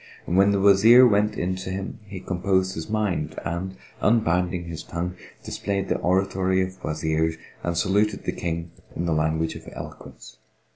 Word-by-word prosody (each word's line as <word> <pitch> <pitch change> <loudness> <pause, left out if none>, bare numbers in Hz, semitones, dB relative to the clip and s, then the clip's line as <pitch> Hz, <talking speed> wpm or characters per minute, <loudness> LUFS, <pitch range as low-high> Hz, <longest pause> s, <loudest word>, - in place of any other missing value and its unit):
When 95 +3 +4
the 100 -1 +2
Wazir 105 +6 +7
went 105 -2 +2
in 90 +1 -1
to 95 - -6
him, 95 +1 -5
he 95 -2 -7
composed 95 0 0
his 80 +1 -6
mind 105 -8 -1
and, 85 +4 -3 0.3
unbinding 90 -5 +2
his 85 -1 -6
tongue, 90 +2 -4 0.3
displayed 100 -1 -3
the - - +1
oratory 95 0 +1
of 95 0 -7
Wazirs 80 +1 0 0.3
and 85 -1 -1
saluted 100 +4 +1
the - - -1
King 85 0 -4 0.2
in 85 - -2
the 85 - +1
language 80 +1 0
of - - -9
eloquence. - - -10
95 Hz, 160 wpm, -24 LUFS, 85-100 Hz, 0.3 s, Wazir